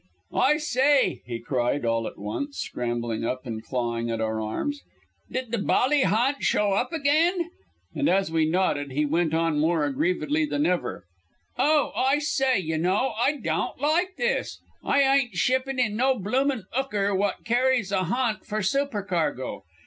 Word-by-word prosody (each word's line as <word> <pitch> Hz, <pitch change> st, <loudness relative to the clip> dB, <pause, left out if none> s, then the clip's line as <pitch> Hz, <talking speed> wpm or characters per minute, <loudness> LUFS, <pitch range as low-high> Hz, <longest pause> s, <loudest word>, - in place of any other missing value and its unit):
"I 295 Hz, +3 st, +3 dB
sye," 285 Hz, -2 st, +2 dB
he 120 Hz, -1 st, -4 dB
cried, 125 Hz, +1 st, -1 dB
all 115 Hz, -1 st, 0 dB
at -, -, -9 dB
once 280 Hz, -, -5 dB
scrambling 120 Hz, -2 st, -3 dB
up 130 Hz, +3 st, -3 dB
and 110 Hz, -2 st, -5 dB
clawing 115 Hz, -2 st, -2 dB
at 115 Hz, -1 st, -2 dB
our 110 Hz, 0 st, -1 dB
arms, 285 Hz, -, -3 dB, 0.5 s
"D'd 255 Hz, -3 st, -4 dB
the 235 Hz, -, 0 dB
bally 265 Hz, +7 st, +2 dB
ha'nt 240 Hz, +8 st, +1 dB
show 205 Hz, -1 st, +2 dB
up 200 Hz, -, 0 dB
agyne?" 330 Hz, +3 st, +1 dB, 0.4 s
And -, -, +1 dB
as 190 Hz, -1 st, +2 dB
we 160 Hz, -1 st, +2 dB
nodded 150 Hz, -6 st, 0 dB
he 150 Hz, +2 st, +1 dB
went 160 Hz, +1 st, +1 dB
on 165 Hz, -2 st, +1 dB
more 160 Hz, 0 st, +2 dB
aggrievedly 180 Hz, -, 0 dB
than 295 Hz, 0 st, -1 dB
ever 125 Hz, -, -1 dB, 0.5 s
"Oh, 300 Hz, 0 st, +2 dB
I 265 Hz, +2 st, +2 dB
sye, 270 Hz, -3 st, +1 dB
y' 160 Hz, -5 st, -1 dB
know, 190 Hz, +10 st, +1 dB
I 290 Hz, +5 st, +2 dB
daon't 250 Hz, -, -2 dB
like 345 Hz, +6 st, +1 dB
this. 485 Hz, 0 st, -1 dB, 0.2 s
I 280 Hz, -, +3 dB
eyen't 270 Hz, -6 st, +2 dB
shipping 260 Hz, +8 st, +1 dB
in 215 Hz, -4 st, +1 dB
no 260 Hz, +1 st, +2 dB
bloomin' 255 Hz, +4 st, 0 dB
'ooker 210 Hz, -7 st, 0 dB
wot 205 Hz, +2 st, -1 dB
carries 245 Hz, -3 st, +2 dB
a 190 Hz, -2 st, +1 dB
ha'nt 230 Hz, +3 st, -1 dB
for 215 Hz, 0 st, -3 dB
supercargo. 195 Hz, -, -1 dB
210 Hz, 165 wpm, -25 LUFS, -, 0.5 s, I